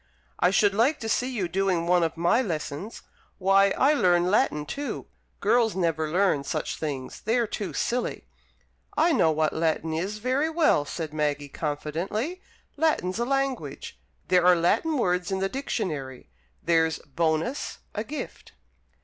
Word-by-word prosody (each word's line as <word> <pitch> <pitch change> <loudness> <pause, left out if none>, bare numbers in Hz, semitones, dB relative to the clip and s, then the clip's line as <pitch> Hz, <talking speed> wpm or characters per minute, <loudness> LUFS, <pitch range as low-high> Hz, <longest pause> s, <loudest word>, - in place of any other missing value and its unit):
"I 180 - +4
should 205 0 +3
like 245 +9 +2
to 225 - -3
see 250 +3 0
you 215 -8 -2
doing 185 -1 0
one 180 0 +3
of 165 -1 -1
my 175 +9 +3
lessons! 165 - -5 0.3
Why, 195 +1 +4
I 280 +3 +4
learn 180 -8 +3
Latin 150 -7 +2
too! 285 - -5 0.4
Girls 235 -4 +3
never 165 -4 0
learn 180 -4 +2
such - - -3
things. 140 -5 -5
They're 230 +2 +2
too 205 -2 -4
silly." 245 +1 -2 0.7
"I 335 +2 +4
know 160 - +4
what 155 0 +1
Latin 160 0 0
is 190 +6 -2
very 260 +7 0
well," 315 - +3
said 155 0 -5
Maggie, 145 -2 -1
confidently. 170 - -3 0.4
"Latin's 260 - +1
a 235 - +1
language. 270 0 -2 0.3
There 180 -1 +4
are 180 0 +6
Latin 220 - +1
words 180 -6 0
in 190 - -1
the 190 0 0
Dictionary. 150 - -4 0.3
There's 160 -1 +2
'bonus, 160 - -2 0.2
a 210 - -2
gift.'" 290 +6 -7
185 Hz, 150 wpm, -26 LUFS, 160-235 Hz, 0.7 s, are